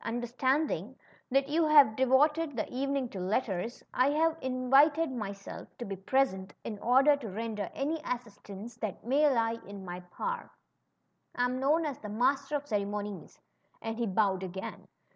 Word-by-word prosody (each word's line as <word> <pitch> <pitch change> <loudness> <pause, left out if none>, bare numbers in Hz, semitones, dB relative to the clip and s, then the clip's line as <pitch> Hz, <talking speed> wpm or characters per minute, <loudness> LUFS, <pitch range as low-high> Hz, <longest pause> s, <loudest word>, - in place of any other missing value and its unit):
Understanding 245 - -1 0.3
that 275 +1 +2
you 315 +2 +2
had 285 -8 +7
devoted 290 +4 +3
the 220 - -1
evening 275 0 -1
to 195 - -7
letters^ 195 +3 -2
I 255 +2 +3
have 320 +2 +2
invited 270 +5 +3
myself 200 -5 -6
to 240 - -5
be 195 - -4
present^ 190 -2 0
in 215 -3 -5
order 265 +6 +5
to 240 -6 -7
render 210 0 -4
any 305 +3 -1
assistance 225 -2 -6
that 215 -1 -5
may 290 +5 +4
lie 230 -2 +1
in 200 -1 -8
my 180 0 -5
power. 475 - -5 0.9
I 245 - +2
am 250 +1 -1
known 305 +5 +2
as 285 -4 -4
the 210 - -7
Master 270 +6 +1
of 290 - -1
Ceremonies/' 205 -3 -3 0.4
and 225 0 -4
he 235 - 0
bowed 195 -1 +2
again. 190 0 -6
245 Hz, 160 wpm, -30 LUFS, 205-275 Hz, 0.9 s, had